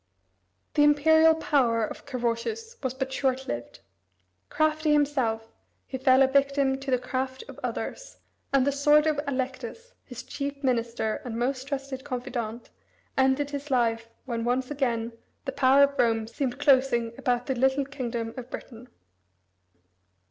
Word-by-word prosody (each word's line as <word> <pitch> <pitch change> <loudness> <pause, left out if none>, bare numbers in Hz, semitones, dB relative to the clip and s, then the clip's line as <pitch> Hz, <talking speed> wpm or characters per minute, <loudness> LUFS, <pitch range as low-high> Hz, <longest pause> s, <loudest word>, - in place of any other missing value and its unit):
The 295 - +3
imperial 315 +2 +5
power 245 -8 +2
of - - -9
Carausius 270 - -3
was 260 -1 -2
but 265 0 -3
short 265 0 0
lived. 120 0 -5 0.7
Crafty 310 0 +2
himself, 260 -7 0 0.3
he 260 - -6
fell 260 0 +5
a - - +5
victim 275 0 +2
to 270 0 -6
the 255 - +3
craft 260 - -3
of - - -11
others, - - -5 0.3
and 275 -2 +3
the 280 - +2
sword 295 +2 +4
of 305 -2 +1
Allectus, 265 - -4
his - - -9
chief 280 0 -5
minister 235 -3 0
and 230 -2 -5
most 260 +2 -1
trusted 275 -2 -4
confidant, 245 -4 -5 0.4
ended 265 +2 +2
his 285 +1 -5
life 230 -3 +1 0.2
when 235 -3 -3
once 250 +3 0
again 240 -5 -1 0.3
the 270 - -2
power 270 +1 +5
of 280 0 +1
Rome 225 -2 +2
seemed 250 +2 -3
closing 260 -5 +3
about 245 0 0
the 265 - 0
little 265 +2 +2
kingdom 240 -4 -4
of 250 -1 -7
Britain. 245 -1 -9
265 Hz, 150 wpm, -27 LUFS, 240-280 Hz, 0.7 s, imperial